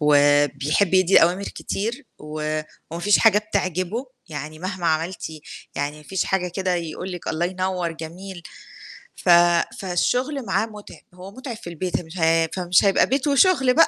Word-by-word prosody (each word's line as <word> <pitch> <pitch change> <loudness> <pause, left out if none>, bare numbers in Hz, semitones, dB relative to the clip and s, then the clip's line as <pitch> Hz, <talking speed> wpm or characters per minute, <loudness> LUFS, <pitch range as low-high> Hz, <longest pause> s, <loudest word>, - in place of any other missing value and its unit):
وبيحب 145 +4 +3
يدّي 185 -1 +6
أوامر 180 +4 +2
كتير 230 +8 -4
و 155 0 -3 0.3
وما 170 - -5
فيش 205 +3 +4
حاجة 215 -2 +5
بتعجبه، 200 - -2 0.2
يعني 155 0 -7
مهما 185 -1 -4
عملتِ 165 +3 -1 0.5
يعني 145 +2 -3
ما 150 - -14
فيش 190 +5 -2
حاجة 185 -2 0
كده 185 0 -1
يقول 175 +2 -4
لِك 175 - -6
الله 170 +2 -1
ينوّر، 185 -2 -2
جميل. 175 +3 -9 0.7
ف 180 - -3 0.5
فالشغل 250 +9 -1
معاه 195 +3 +1
متعب، 210 -2 -12
هو 185 +2 -11
متعب 255 -1 -7
في 175 - -9
البيت 175 +2 -2
مش 165 +3 -11
ه 165 0 +3
فمش 180 +1 +3
هيبقى 195 - +4
بيت 275 +3 0
وشغل 280 -3 +4
بقى. 330 - +6
180 Hz, 160 wpm, -23 LUFS, 160-205 Hz, 0.7 s, يدّي